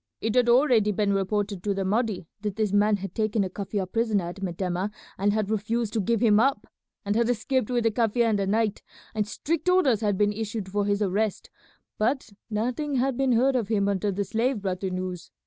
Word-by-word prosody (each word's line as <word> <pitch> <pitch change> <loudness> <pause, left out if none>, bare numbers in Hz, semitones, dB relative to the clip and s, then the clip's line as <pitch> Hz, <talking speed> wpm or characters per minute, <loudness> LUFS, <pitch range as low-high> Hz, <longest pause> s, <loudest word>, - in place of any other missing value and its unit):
It 220 0 -1
had 245 -1 +3
already 240 -4 +4
been 200 0 +1
reported 200 0 -1
to 200 +1 -1
the 195 -1 -1
Mahdi 215 -2 0 0.2
that 210 -2 -3
this 215 -2 0
man 205 +1 +4
had 195 0 -7
taken 215 -2 0
a 185 - -4
Kaffir 200 0 -3
prisoner 210 -3 0
at 185 +3 -9
Metemmeh 180 +1 -2 0.3
and 200 +2 +1
had 215 0 -1
refused 220 +1 -1
to 225 - +1
give 230 +2 0
him 215 -3 +5
up, 255 -3 +2 0.4
and 205 +1 0
had 235 +1 +2
escaped 245 +1 0
with 245 -2 +1
the 225 - +3
Kaffir 230 +1 +2
in - - +2
the 195 -1 -1
night; 215 +1 0 0.3
and 215 -1 -1
strict 320 - -2
orders 280 - +3
had 205 -3 +1
been 205 +1 +2
issued 215 -2 -4
for 205 +1 0
his 205 +1 +1
arrest, 205 +2 -1 0.5
but 235 +2 0 0.2
nothing 250 +7 -1
had 260 +1 +1
been 265 0 +2
heard 260 +3 +3
of 235 -5 0
him 200 -2 +1
until 200 0 0
the 200 +1 -1
slave 230 +4 0
brought 185 -2 -2
the 190 - -2
news. 185 -1 -5
210 Hz, 215 wpm, -26 LUFS, 200-235 Hz, 0.5 s, him